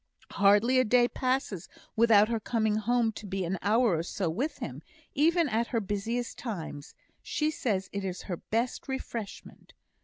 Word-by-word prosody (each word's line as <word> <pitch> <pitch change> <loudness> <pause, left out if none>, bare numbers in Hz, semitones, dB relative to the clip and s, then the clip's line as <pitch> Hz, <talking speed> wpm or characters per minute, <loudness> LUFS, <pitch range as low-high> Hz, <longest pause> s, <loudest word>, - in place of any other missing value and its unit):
"Hardly 205 +6 +4
a - - +5
day 245 +1 +4
passes 255 -9 -2 0.3
without 220 -2 +6
her 230 0 -1
coming 220 -1 0
home 230 +1 +1
to 210 -1 -9
be 190 -1 -2
an 180 +2 -2
hour 220 -1 +3
or - - 0
so 175 0 -2
with 260 - -2
him, - - -6 0.3
even 330 +3 +3
at 235 -1 0
her 230 - 0
busiest 220 +4 -3
times; 165 - -6 0.3
she 305 0 -1
says 200 -10 -1
it 200 0 -3
is 185 -1 -4
her 175 - -4
best 235 +9 -2
refreshment. 235 -5 -7
220 Hz, 165 wpm, -29 LUFS, 200-245 Hz, 0.3 s, without